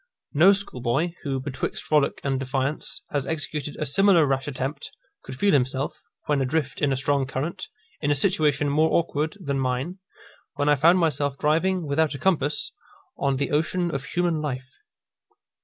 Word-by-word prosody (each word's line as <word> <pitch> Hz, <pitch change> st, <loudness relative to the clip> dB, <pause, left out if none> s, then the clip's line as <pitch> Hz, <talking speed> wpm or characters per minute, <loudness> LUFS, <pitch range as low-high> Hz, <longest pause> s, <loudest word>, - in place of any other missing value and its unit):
No 170 Hz, +6 st, +7 dB
schoolboy, 160 Hz, -5 st, 0 dB
who, 135 Hz, -2 st, -2 dB
betwixt 135 Hz, 0 st, -4 dB
frolic 150 Hz, -2 st, +1 dB
and 135 Hz, -1 st, 0 dB
defiance, 135 Hz, +2 st, -2 dB
has 140 Hz, -2 st, -1 dB
executed 155 Hz, -2 st, -3 dB
a -, -, -2 dB
similar 185 Hz, +2 st, +4 dB
rash 135 Hz, 0 st, -1 dB
attempt, 135 Hz, +1 st, -4 dB, 0.3 s
could 130 Hz, -, -8 dB
feel 200 Hz, +7 st, +3 dB
himself, 135 Hz, +1 st, 0 dB, 0.2 s
when 145 Hz, -2 st, +1 dB
adrift 135 Hz, -1 st, -1 dB
in 145 Hz, -, +2 dB
a 135 Hz, -, +1 dB
strong 135 Hz, 0 st, +1 dB
current, 140 Hz, +5 st, -4 dB, 0.3 s
in 145 Hz, -, 0 dB
a 145 Hz, -, +3 dB
situation 150 Hz, -3 st, +2 dB
more 155 Hz, +3 st, +3 dB
awkward 160 Hz, +1 st, 0 dB
than 140 Hz, -6 st, -2 dB
mine, 130 Hz, +8 st, -2 dB, 0.6 s
when 145 Hz, +1 st, +1 dB
I 145 Hz, -, +6 dB
found 165 Hz, +6 st, +5 dB
myself 145 Hz, -5 st, 0 dB
driving, 165 Hz, +4 st, +1 dB
without 150 Hz, +1 st, +1 dB
a -, -, -4 dB
compass, 150 Hz, -2 st, 0 dB, 0.5 s
on 140 Hz, -1 st, +1 dB
the 140 Hz, -, -2 dB
ocean 170 Hz, +3 st, 0 dB
of 135 Hz, -, -3 dB
human 170 Hz, -1 st, 0 dB
life. 130 Hz, -3 st, -4 dB
145 Hz, 165 wpm, -25 LUFS, 135-160 Hz, 0.6 s, No